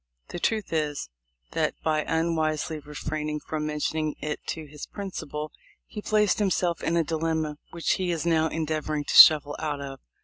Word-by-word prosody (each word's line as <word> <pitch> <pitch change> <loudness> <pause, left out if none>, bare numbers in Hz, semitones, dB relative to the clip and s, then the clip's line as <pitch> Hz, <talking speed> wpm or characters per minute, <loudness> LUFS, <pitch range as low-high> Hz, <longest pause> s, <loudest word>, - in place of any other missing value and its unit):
The 175 - -5
truth 215 -1 -1
is, 150 - -1 0.4
that, - - 0
by 155 -1 +2
unwisely 160 -1 0
refraining 150 +1 -4
from 155 0 -4
mentioning 155 0 -1
it 150 0 -3
to 160 -1 -4
his 150 0 -9
principal, 155 -7 -5 0.3
he 210 - -7
placed 210 -2 +2
himself 180 -4 +1
in 170 - +1
a 165 - +3
dilemma 160 -1 -1
which 170 -1 -1
he 185 -1 0
is 170 -1 -1
now 160 -1 +3
endeavoring 155 -2 -2
to - - -3
shuffle 145 -2 +9
out 150 -2 -2
of. 135 -1 -7
155 Hz, 165 wpm, -26 LUFS, 150-165 Hz, 0.4 s, shuffle